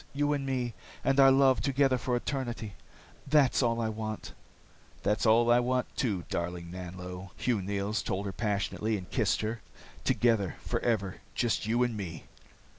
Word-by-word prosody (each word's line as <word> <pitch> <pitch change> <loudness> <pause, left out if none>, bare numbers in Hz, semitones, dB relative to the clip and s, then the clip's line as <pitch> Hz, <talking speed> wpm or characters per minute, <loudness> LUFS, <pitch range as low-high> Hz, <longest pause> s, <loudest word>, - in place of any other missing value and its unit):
You 145 +1 +2
and 140 -1 -2
me, 125 -3 -1 0.3
and 135 0 +2
our 135 0 +9
love, 135 -1 +5
together 135 -2 +2
for 125 +1 0
eternity. 120 -5 -3 0.5
That's 140 -3 +4
all 115 -2 +1
I 110 -1 0
want." 110 0 -5 0.7
"That's 105 +3 +1
all 115 +2 +5
I 120 - +6
want, 125 +1 -1
too, 100 -9 0
darling 85 0 -3
Nanlo," 90 +1 -7
Hugh 120 -5 0
Neils 100 +3 -1
told 100 +2 -2
her 100 - -3
passionately, 105 +1 -1
and 90 -2 -8
kissed - - +1
her. 110 +1 -3 0.4
"Together, 110 -7 +2
forever. 100 -5 -1 0.2
Just 115 -3 0
you 120 +2 +3
and 120 -2 -1
me." 85 -6 -6
115 Hz, 160 wpm, -30 LUFS, 100-125 Hz, 0.7 s, our